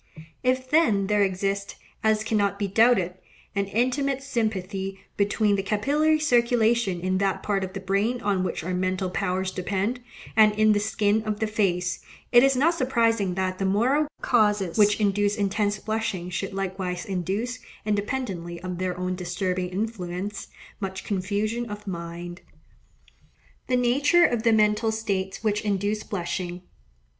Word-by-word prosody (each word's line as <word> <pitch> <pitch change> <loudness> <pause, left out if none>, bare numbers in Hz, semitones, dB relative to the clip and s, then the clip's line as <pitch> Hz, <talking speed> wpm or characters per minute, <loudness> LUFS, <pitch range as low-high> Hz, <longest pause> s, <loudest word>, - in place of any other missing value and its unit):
If, 255 0 +1
then, 225 -12 +4
there 210 +1 +2
exists, 195 +1 -1 0.3
as 215 0 +2
cannot 205 -3 +1
be 200 -1 -1
doubted, 200 -3 +3 0.4
an 200 0 +1
intimate 255 +6 0
sympathy 195 -6 -2 0.2
between 205 0 +2
the - - 0
capillary 290 +10 +2
circulation 235 - +2
in 185 +1 0
that 195 -1 0
part 200 -2 0
of 190 0 -5
the 195 - -4
brain 200 +6 0
on 195 -2 +1
which 185 - -3
our 185 +2 -3
mental 185 0 -1
powers 190 0 -1
depend, 200 +6 -2 0.4
and 215 -1 +6
in 215 +1 +4
the 205 - +3
skin 210 0 +1
of 215 -1 -3
the 220 - +1
face, 180 -5 0 0.3
it 240 0 +7
is 270 0 +4
not 305 +7 +3
surprising 230 - +1
that 185 0 -2
the 195 - 0
moral 250 +10 +2 0.2
causes 210 -6 +2
which 210 -1 +4
induce 205 0 +2
intense 205 0 0
blushing 200 -4 -3
should 190 +2 -3
likewise 190 -2 -3
induce, 200 +7 -2 0.3
independently 205 -5 -2
of 180 -1 -4
their 185 -1 -2
own 180 0 -2
disturbing 180 0 -2
influence, 195 -1 -4 0.3
much 190 -1 -4
confusion 210 +4 -2
of 210 0 -7
mind. 175 -1 -6 1.3
The 250 - +2
Nature 280 +8 +4
of 240 -2 +1
the 230 0 +3
Mental 215 +1 +3
States 200 -3 -3
which 210 -1 +1
induce 205 0 -1
Blushing. 180 -2 -4
205 Hz, 150 wpm, -25 LUFS, 185-225 Hz, 1.3 s, it